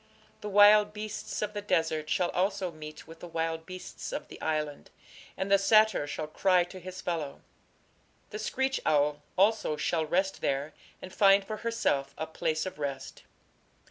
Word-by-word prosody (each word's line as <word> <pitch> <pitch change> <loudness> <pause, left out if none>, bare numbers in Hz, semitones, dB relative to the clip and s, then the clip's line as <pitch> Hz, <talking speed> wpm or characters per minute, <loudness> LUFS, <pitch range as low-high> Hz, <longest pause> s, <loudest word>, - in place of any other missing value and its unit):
The 210 - -5
wild 205 +1 +6
beasts 215 0 -5
of 210 0 -3
the 205 - -4
desert 160 -5 0
shall 175 +2 +1
also 190 0 0
meet 155 -1 -10
with 165 +1 -13
the 175 - -8
wild 165 -1 -3
beasts 185 - -7
of - - -5
the - - -11
island, 150 -2 -2 0.5
and 190 +1 -3
the 200 - +6
satyr 215 -5 +4
shall 155 +1 -4
cry 180 +3 +3
to 180 +2 -10
his 185 +1 -8
fellow: 160 -6 -3 0.9
the 210 - -5
screech 265 +5 -1
owl 145 0 +2 0.2
also 200 -5 +2
shall 160 -1 0
rest 190 +4 0
there, 140 +2 -1 0.3
and 185 - -9
find 195 -1 +5
for 215 +1 -5
herself 140 -13 -1
a 160 - -2
place 160 0 -2
of 185 -3 -7
rest. 140 -2 -5
180 Hz, 170 wpm, -29 LUFS, 155-205 Hz, 0.9 s, wild